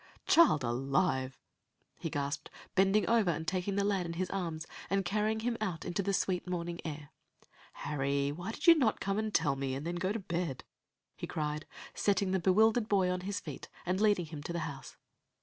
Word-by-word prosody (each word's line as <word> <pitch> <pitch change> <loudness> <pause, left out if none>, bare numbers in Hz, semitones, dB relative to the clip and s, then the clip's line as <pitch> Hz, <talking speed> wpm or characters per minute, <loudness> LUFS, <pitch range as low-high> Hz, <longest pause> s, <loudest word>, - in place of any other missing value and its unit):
"Child 315 - +6
alive!" 130 +1 0 0.6
he 165 - -3
gasped, 145 0 -3 0.2
bending 195 0 +3
over 225 -5 +3
and 160 -1 -2
taking 185 +3 -1
the 200 - +2
lad 195 -3 +1
in 170 - -4
his 180 +2 -2
arms, 165 -4 -3 0.2
and 195 -1 +1
carrying 215 +3 0
him 235 +1 0
out 185 -6 -2
into 180 +2 -1
the 200 +1 0
sweet 185 -1 0
morning 175 -1 -3
air. 150 -2 -6 0.6
"Harry, 140 -1 -1
why 175 +8 -5
did - - -6
you 340 - +10
not 265 -9 +2
come 195 +1 -1
and 215 0 -1
tell 160 -7 +2
me, 135 -1 -2
and 140 +3 -5
then 175 +1 -2
go 185 +2 0
to 220 - -1
bed?" 170 - -3 0.5
he - - -6
cried, 150 0 -3 0.3
setting 200 -1 +1
the 190 - +2
bewildered 215 +5 +4
boy 190 -3 +3
on 180 0 -2
his 200 +2 -3
feet, 150 -4 -8 0.2
and 185 +3 0
leading 205 -5 +3
him 155 -2 -8
to 145 - -5
the 170 - -2
house. 140 -3 -8
180 Hz, 200 wpm, -32 LUFS, 150-200 Hz, 0.6 s, you